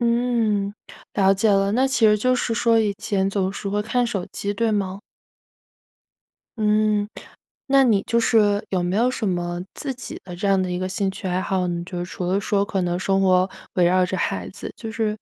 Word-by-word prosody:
嗯， 235 -4 +1 0.4
了 195 -1 +4
解 205 +3 +1
了， 195 0 +2
那 260 +4 +3
其 230 -4 +3
实 210 0 +4
就 255 +3 +2
是 235 - -1
说 230 +1 +3
以 210 -2 +1
前 195 -2 0
总 190 -2 0
是 200 - -7
会 205 +1 0
看 240 +3 0
手 195 -6 -3
机， 200 0 -3
对 230 +2 0
吗？ 195 -2 -2 1.6
嗯， 210 -1 +2 0.6
那 270 -1 +5
你 205 -5 +3
就 235 - +2
是， 210 -3 +3
有 185 -2 0
没 180 +3 -1
有 245 +3 +3
什 220 -5 -2
么 175 -1 -2
自 275 -2 -3
己 245 -1 -8
的 180 -2 -8
这 195 +3 -2
样 195 -1 +3
的 185 - -3
一 180 - -2
个 185 - -2
兴 190 +1 -1
趣 190 0 -6
爱 180 - 0
好？ 185 -2 -1
嗯， 170 0 -3
就 180 -1 -6
是 - - -3
除 180 - -5
了 190 +3 +1
说 200 0 +1
可 200 -2 -2
能 175 0 -1
生 195 +1 +1
活 185 0 +3 0.2
围 180 - +3
绕 180 +1 +3
着 190 - -3
孩 95 - -2
子， - - -8
就 225 -1 -6
是 220 -1 -2
200 Hz, 235 characters per minute, -22 LUFS, 185-225 Hz, 1.6 s, 那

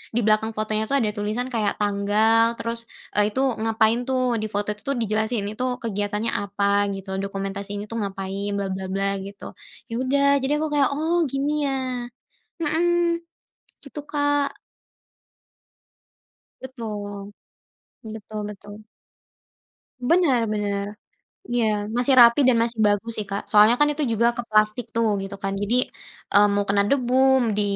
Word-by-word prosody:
di - - +3
belakang 215 +1 +2
fotonya 215 0 -1
tuh 280 - 0
ada 215 -4 0
tulisan 215 +4 -2
kayak 215 -3 0
tanggal, 215 +3 +2
terus, 230 0 -3 0.4
eee, 205 0 +4
itu 260 - 0 0.2
ngapain 225 +1 +2
tuh. 255 -3 +1
Di 215 - -2
foto 205 0 -1
itu 210 0 -9
tuh 275 - +1
dijelasin. 220 0 0
Itu 230 +4 -5 0.2
kegiatannya 210 +1 -2
apa 200 0 -3 0.3
gitu, 195 0 -9
dokumentasi 195 +1 -5
ini 205 - -4
tuh 230 - -3
ngapain, 195 0 -4
bla 200 -1 -2
bla 190 0 -4
bla 195 0 0
gitu. 200 +1 -10 0.5
Ya - - -4
udah, 280 +2 +2 0.2
jadi 280 +2 +1
aku 315 - -1
kayak, 280 -3 +4
“Oh 320 +3 0 0.2
gini 275 +2 -1 0.2
ya.” 270 - -1 0.9
Mhm, 340 +2 +1 0.6
gitu, 280 - -8
Kak. 290 -1 0 2.0
Betul, 205 -5 -7 0.7
betul 215 -1 -7
betul. 205 +1 -12 1.2
Bener 325 -9 +4
bener. 200 -1 -2 0.7
Iya, 240 -2 +2 0.3
masih 250 +2 +3
rapi 235 +2 +8
dan 240 -2 +4
masih 230 -1 -4
bagus 205 +3 0
sih, 215 - -3
Kak. 200 +1 -2
Soalnya 215 +3 +6
kan 295 - +5
itu 300 +1 -2
juga 230 +1 +2
ke 240 - -1
plastik 215 +2 +2
tuh 230 -1 +2 0.2
gitu 195 0 -6
kan. 195 0 -1
Jadi, 205 +4 0 0.6
eee, 205 0 +7
mau 205 0 +1
kena 200 0 +3
debu, 255 -2 +1 0.4
di - - +3
220 Hz, 150 wpm, -23 LUFS, 205-250 Hz, 2.0 s, rapi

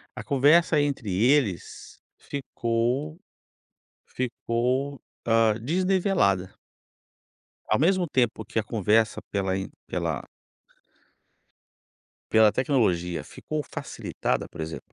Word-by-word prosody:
a - - -6
conversa 150 +4 +4
entre 135 -8 -2
eles 115 -2 0 0.2
ficou 130 +2 -2 0.9
ficou, 125 +2 -2 0.3
hã, 115 -1 +4
desnivelada 175 - +1 1.1
ao - - +3
mesmo 180 +3 +3
tempo 120 -6 0
que - - -3
a 110 - +2
conversa 110 0 +1
pela 95 -2 0
in, 95 - -4 0.2
pela - - -2 2.1
pela 110 -1 +6
tecnologia 95 - +1
ficou 155 -1 -5
facilitada, - - -3
por 85 - -10
exemplo 80 0 -7
120 Hz, 90 wpm, -26 LUFS, 105-145 Hz, 2.1 s, pela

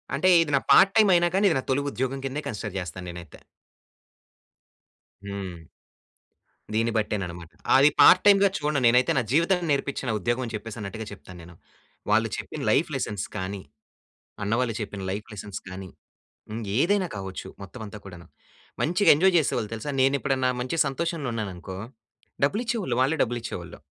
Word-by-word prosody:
అంటే 150 +7 +1
ఇది 160 -3 -1
నా - - -1
పార్ట్‌టైం 210 +2 +6
అయినా 175 0 +4
కానీ, 200 - +3
ఇది - - +1
నా - - -5
తొలి 135 +2 +2
ఉద్యోగం 130 +1 -2
కిందే 135 +3 -3
కన్సిడర్ 105 -3 -5
చేస్తాను 90 0 -7
నేనైతే. 85 -2 -10 1.9
హ్మ్. 95 -5 -7 1.1
దీన్ని 115 +1 +1
బట్టేననమాట. 90 -6 -3 0.3
అది 140 +2 +6
పార్ట్‌ 185 - +8
టైమ్‌గా 200 -1 +6
చూడను. 150 -1 0
నేనైతే 125 +2 +4
నా - - +4
జీవితాన్ని 170 +4 +2
నేర్పించిన 140 -2 -2
ఉద్యోగం 120 +6 -1
అని 115 - -7
చెప్పేసి 110 +1 -7
అన్నట్టుగా 105 +2 -6
చెప్తాను 90 -2 -12
నేను. 85 +1 -14 0.5
వాళ్ళు - - +3
చెప్పిన - - -6
లైఫ్ - - +2
లెసన్స్ 105 -3 -3
కానీ, 95 +1 -4 0.8
అన్న 100 +1 -2
వాళ్ళు 115 -3 -1
చెప్పిన 100 -2 -5
లైఫ్ 105 +2 -4
లెసన్స్ 105 -1 -7
కానీ 95 0 -8 0.6
ఇంగేదైనా 130 - +1
కావచ్చు 95 -1 -6
మొత్తం 100 +6 -10
అంతా 105 +1 -9
కూడాను. 90 -3 -11 0.5
మంచిగా 175 +6 +3
ఎంజాయ్ 185 +5 +3
చేసేవాళ్ళు 115 -8 -1
తెలుసా? 115 +6 -5
నేనెప్పుడన్నా 135 -1 +2
మంచి 130 +6 -3
సంతోషంలో 150 +1 -2
ఉన్నాననుకో 95 -5 -5 0.7
డబ్బులిచ్చేవాళ్ళు. 215 - -1
వాళ్ళే 135 +5 +2
డబ్బులిచ్చేవాళ్ళు. 115 -8 -4
115 Hz, 145 wpm, -25 LUFS, 100-145 Hz, 1.9 s, పార్ట్‌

